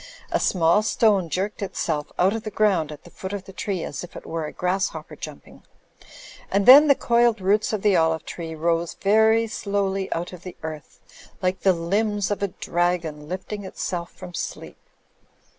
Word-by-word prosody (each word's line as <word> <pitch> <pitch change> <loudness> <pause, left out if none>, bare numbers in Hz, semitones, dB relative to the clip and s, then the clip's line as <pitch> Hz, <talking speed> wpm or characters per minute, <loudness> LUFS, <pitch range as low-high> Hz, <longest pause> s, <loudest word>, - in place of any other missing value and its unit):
A - - +2
small 170 +2 +3
stone 210 -5 +2
jerked 195 +6 -2
itself 160 -6 -2
out 190 +3 +3
of 225 - -3
the 215 - -5
ground 195 -7 +1
at 150 - -10
the 175 - -15
foot 190 +1 -7
of 200 -2 -4
the 195 - -12
tree 190 -2 -3
as 145 - -5
if 175 - -11
it - - -9
were 160 -2 -3
a - - -7
grasshopper 190 +2 -2
jumping; - - -10 0.9
and 200 0 +1
then 285 +4 +10
the 280 - +6
coiled 235 -2 +2
roots 200 +3 +2
of 215 -3 -2
the 205 -2 +4
olive 160 -1 +2
tree 165 -2 -6
rose 165 +1 0
very 220 +3 +4
slowly 200 -3 -2
out 175 +2 -3
of 180 - -10
the 180 -1 -9
earth 155 -2 -8 0.4
like 185 +1 +1
the 190 - +4
limbs 205 +4 0
of 205 - -2
a 200 - +1
dragon 170 -4 -2
lifting 190 +3 -5
itself 175 -2 -4
from 180 -1 -11
sleep. - - -6
190 Hz, 185 wpm, -24 LUFS, 170-205 Hz, 0.9 s, then